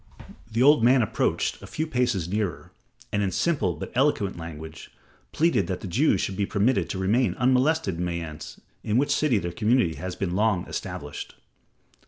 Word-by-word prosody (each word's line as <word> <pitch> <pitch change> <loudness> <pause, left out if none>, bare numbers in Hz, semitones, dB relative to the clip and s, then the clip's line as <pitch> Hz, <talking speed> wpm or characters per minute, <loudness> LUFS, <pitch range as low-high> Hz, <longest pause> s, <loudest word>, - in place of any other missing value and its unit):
The 115 +3 +2
old 145 -3 +6
man 125 +1 +5
approached 110 - -1
a - - -10
few 155 - -3
paces 125 - 0
nearer, 100 -3 -3 0.4
and 105 - +1
in 100 - +1
simple, 115 - 0
but - - -7
eloquent 125 -7 +1
language, 80 -1 -9 0.4
pleaded 135 - +2
that 90 0 -3
the - - -6
Jews 110 - +2
should 95 - -2
be 100 0 -1
permitted 110 +5 +1
to - - -3
remain 110 +7 +1
unmolested 130 - +2
in 90 - -1
Mayence 85 -3 -6 0.2
in 105 +2 0
which 140 +3 +2
city 145 -7 +2
their 85 -3 -3
community 110 -2 +2
had 90 0 -5
been 95 -3 -2
long 105 -3 +1
established. - - -6
105 Hz, 175 wpm, -25 LUFS, 90-130 Hz, 0.4 s, old